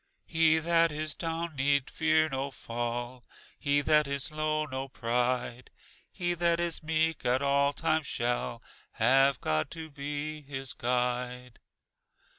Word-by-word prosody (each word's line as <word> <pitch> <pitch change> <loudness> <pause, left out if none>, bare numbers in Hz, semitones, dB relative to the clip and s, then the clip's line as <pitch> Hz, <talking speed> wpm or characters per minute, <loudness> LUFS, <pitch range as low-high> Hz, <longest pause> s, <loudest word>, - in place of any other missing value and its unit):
"He 160 -1 +4
that 165 0 +3
is 155 0 -2
down 165 -1 -3
need 140 0 +2
fear 155 0 +3
no 135 -1 -3
fall, 120 0 -4 0.4
He 145 -1 +2
that 150 0 +4
is 140 +1 -2
low, 155 0 0
no 135 -1 -5
pride, 125 0 -1 0.4
He 175 -2 -1
that 170 0 +2
is 170 -2 -1
meek 160 0 0
at 125 +3 +1
all 140 0 +3
times 155 0 0
shall 120 - -2 0.3
Have 135 +3 +4
God 75 0 0
to 160 -1 -8
be 145 +1 -4
his 135 -2 -5
guide." 125 0 -2
140 Hz, 135 wpm, -29 LUFS, 125-155 Hz, 0.4 s, He